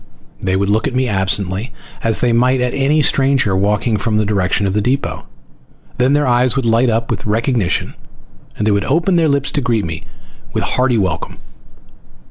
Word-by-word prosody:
They 95 Hz, -1 st, 0 dB
would 100 Hz, +1 st, 0 dB
look 110 Hz, +5 st, +1 dB
at 130 Hz, -, -4 dB
me 130 Hz, 0 st, +1 dB
absently 95 Hz, +1 st, -1 dB, 0.3 s
as 115 Hz, -1 st, 0 dB
they 120 Hz, -1 st, +2 dB
might 125 Hz, +2 st, +2 dB
at 125 Hz, 0 st, -1 dB
any 145 Hz, +3 st, +2 dB
stranger 135 Hz, -8 st, +2 dB
walking 105 Hz, +3 st, +1 dB
from 105 Hz, +1 st, -1 dB
the 110 Hz, -, +1 dB
direction 100 Hz, -1 st, 0 dB
of 95 Hz, -, -1 dB
the 105 Hz, -, +1 dB
depot, 130 Hz, +6 st, -2 dB, 0.7 s
then 130 Hz, +3 st, +3 dB
their 145 Hz, 0 st, +2 dB
eyes 125 Hz, 0 st, +2 dB
would 135 Hz, -3 st, -1 dB
light 115 Hz, +2 st, +3 dB
up 115 Hz, 0 st, -1 dB
with -, -, -3 dB
recognition 115 Hz, -3 st, 0 dB, 0.6 s
and 105 Hz, -, -1 dB
they 110 Hz, -, +2 dB
would 100 Hz, 0 st, 0 dB
open 170 Hz, +6 st, +1 dB
their 165 Hz, -2 st, +3 dB
lips 140 Hz, -1 st, 0 dB
to 145 Hz, -, 0 dB
greet 115 Hz, -6 st, 0 dB
me 80 Hz, -1 st, -6 dB, 0.5 s
with -, -, -1 dB
hearty 125 Hz, -2 st, +1 dB
welcome. 95 Hz, -3 st, -2 dB
115 Hz, 190 wpm, -16 LUFS, 100-130 Hz, 0.7 s, then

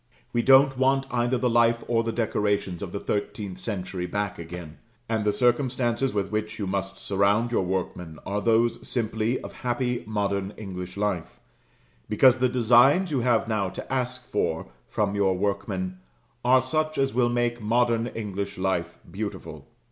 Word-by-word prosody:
We 120 Hz, -, +2 dB
don't 135 Hz, +1 st, +5 dB
want 135 Hz, +1 st, +3 dB
either 120 Hz, +1 st, +1 dB
the 125 Hz, +1 st, +1 dB
life 115 Hz, 0 st, +3 dB
or 115 Hz, -1 st, +2 dB
the 115 Hz, -, -1 dB
decorations 105 Hz, -5 st, -1 dB
of 95 Hz, -, -5 dB
the 100 Hz, -, -3 dB
thirteenth 100 Hz, -2 st, -3 dB
century 90 Hz, -4 st, -4 dB
back 105 Hz, +1 st, -3 dB
again; 85 Hz, -1 st, -8 dB, 0.3 s
and 110 Hz, -2 st, 0 dB
the 105 Hz, -, +2 dB
circumstances 125 Hz, +2 st, +1 dB
with 100 Hz, -1 st, -2 dB
which 110 Hz, 0 st, -2 dB
you 105 Hz, -, -3 dB
must 95 Hz, 0 st, -3 dB
surround 100 Hz, +4 st, +1 dB
your 120 Hz, -, +2 dB
workmen 90 Hz, -3 st, -3 dB
are 100 Hz, +1 st, -2 dB
those 115 Hz, +2 st, +2 dB
simply 110 Hz, 0 st, -1 dB
of -, -, -8 dB
happy 125 Hz, -1 st, -2 dB
modern 100 Hz, -2 st, -1 dB
English 90 Hz, -3 st, -7 dB
life, 90 Hz, -12 st, -2 dB, 0.7 s
because 130 Hz, +4 st, +5 dB
the 130 Hz, 0 st, +3 dB
designs 125 Hz, -, +5 dB
you 140 Hz, -, +1 dB
have 120 Hz, -2 st, +2 dB
now 105 Hz, -4 st, 0 dB
to 130 Hz, -, -7 dB
ask 125 Hz, -1 st, -2 dB
for -, -, -2 dB, 0.2 s
from 105 Hz, -2 st, 0 dB
your 95 Hz, -2 st, +2 dB
workmen 95 Hz, -2 st, -2 dB, 0.4 s
are 125 Hz, +1 st, +5 dB
such 155 Hz, +4 st, -1 dB
as 135 Hz, 0 st, +1 dB
will 120 Hz, 0 st, +3 dB
make 120 Hz, 0 st, 0 dB
modern 115 Hz, +1 st, +2 dB
English 100 Hz, -3 st, -4 dB
life 95 Hz, -2 st, -1 dB
beautiful. 100 Hz, +2 st, -6 dB
110 Hz, 165 wpm, -26 LUFS, 100-120 Hz, 0.7 s, don't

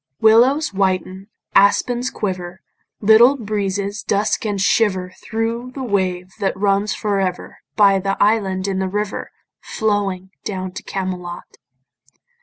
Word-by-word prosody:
Willows 240 Hz, +5 st, +4 dB
whiten, 190 Hz, 0 st, -1 dB, 0.3 s
aspens 240 Hz, +5 st, +3 dB
quiver, 185 Hz, -2 st, -5 dB, 0.4 s
Little 225 Hz, +6 st, +6 dB
breezes 205 Hz, -2 st, -2 dB
dusk 210 Hz, +2 st, 0 dB
and 205 Hz, -2 st, -2 dB
shiver 190 Hz, -3 st, +1 dB
Thro' 230 Hz, +2 st, -3 dB
the 265 Hz, +1 st, -7 dB
wave 185 Hz, -5 st, -1 dB
that 195 Hz, -2 st, -1 dB
runs 200 Hz, +1 st, +1 dB
for 205 Hz, -2 st, -1 dB
ever 185 Hz, -2 st, -3 dB, 0.2 s
By 200 Hz, -2 st, +5 dB
the 195 Hz, +1 st, -2 dB
island 200 Hz, -3 st, +1 dB
in 190 Hz, -1 st, -1 dB
the 190 Hz, 0 st, -1 dB
river 210 Hz, +1 st, -3 dB, 0.3 s
Flowing 200 Hz, -4 st, -2 dB
down 185 Hz, -3 st, -4 dB
to -, -, -7 dB
Camelot. 180 Hz, -2 st, -6 dB
200 Hz, 125 wpm, -20 LUFS, 190-215 Hz, 0.4 s, Little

